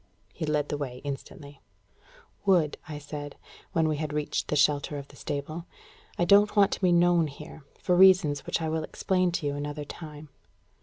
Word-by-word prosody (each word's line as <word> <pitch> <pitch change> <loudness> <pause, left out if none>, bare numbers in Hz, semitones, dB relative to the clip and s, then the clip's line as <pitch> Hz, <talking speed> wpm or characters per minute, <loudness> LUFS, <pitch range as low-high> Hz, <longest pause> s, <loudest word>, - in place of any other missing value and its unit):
He 160 - -4
led 150 -1 0
the 145 - -3
way 125 -3 -5
instantly. 140 +1 -8 0.8
"Wood," 180 -7 +3
I 150 - -5
said, 145 0 -7 0.4
when 160 -1 +2
we 155 -1 0
had 150 0 -3
reached 150 0 -2
the - - -1
shelter 145 0 +2
of 140 0 -8
the - - -16
stable, 155 +5 -5 0.5
"I 175 - +2
don't 205 +3 +5
want 200 -2 +5
to - - -3
be 185 -2 +3
known 175 -1 +4
here, 150 +2 -11 0.2
for 180 - +1
reasons 180 -6 +5
which 165 - -1
I 160 - -1
will 160 0 -1
explain 185 +2 0
to 165 - -2
you 145 - 0
another 145 +1 -5
time." 150 -1 -10
150 Hz, 190 wpm, -27 LUFS, 145-175 Hz, 0.8 s, don't